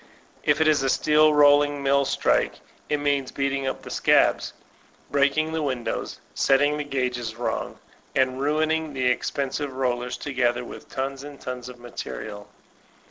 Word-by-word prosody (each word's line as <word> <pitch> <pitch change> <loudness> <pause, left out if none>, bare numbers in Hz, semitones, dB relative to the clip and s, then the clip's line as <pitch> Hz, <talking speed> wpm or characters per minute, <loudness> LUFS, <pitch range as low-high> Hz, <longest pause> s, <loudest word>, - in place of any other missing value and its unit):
If 145 +1 +2
it 160 - +3
is 150 -3 +4
a 135 - +1
steel 155 +3 +4
rolling 145 -1 +4
mill 140 0 +3
strike, - - +1 0.3
it 150 - +2
means 140 -2 0
beating 140 -1 -1
up 130 - -4
the - - -9
scabs, - - +3 0.6
breaking 145 +3 +2
the 160 0 -1
windows, 130 -5 -3
setting 145 +2 +3
the 150 - -2
guages 125 -5 -2
wrong, 120 - -3 0.4
and 130 0 +1
ruining 155 +1 0
the 130 -2 -1
expensive 135 +2 -1
rollers 125 -2 -1
together 125 -3 0
with - - -11
tons 135 +1 -4
and 145 -1 -10
tons 125 -1 -6
of 125 - -11
material. 105 -3 -7
140 Hz, 150 wpm, -25 LUFS, 125-145 Hz, 0.6 s, is